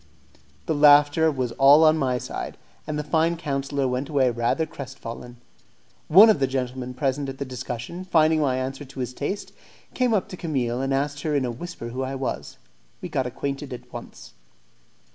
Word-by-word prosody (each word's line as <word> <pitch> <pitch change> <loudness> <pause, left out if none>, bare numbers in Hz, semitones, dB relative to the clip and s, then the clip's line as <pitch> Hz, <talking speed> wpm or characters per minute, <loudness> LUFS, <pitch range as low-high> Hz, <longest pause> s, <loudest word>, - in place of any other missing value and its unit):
The 160 - 0
laughter 145 +2 +6
was 130 -4 -2
all 140 +3 +7
on 155 0 +6
my 130 -5 0
side, 120 - -6 0.3
and 155 -1 -2
the 150 - -2
fine 160 +3 +1
councillor 140 -3 -2
went 125 +2 -2
away 135 -4 +2
rather 120 +7 0
crestfallen. 125 -5 -9 0.7
One 195 +8 +9
of 215 -9 +4
the 135 - +2
gentlemen 125 -1 -4
present 135 0 -1
at 135 - -7
the 140 - -4
discussion, 125 +6 -6
finding 160 -3 +3
my 130 -3 +1
answer 130 +2 -4
to 135 -1 -11
his 125 0 -3
taste, 190 +10 -4 0.4
came 250 -3 +2
up 195 - 0
to 185 - -8
Camille, 130 -7 -2
and 135 0 -1
asked 145 +1 -1
her 150 -1 -1
in 135 -2 +1
a 120 - -2
whisper 120 -2 -7
who 125 +3 -4
I 135 +1 -3
was. 135 -1 -4 0.4
We - - -7
got 130 -1 -1
acquainted 140 +2 -4
at 125 0 -11
once. 120 - -10
135 Hz, 185 wpm, -24 LUFS, 130-155 Hz, 0.7 s, One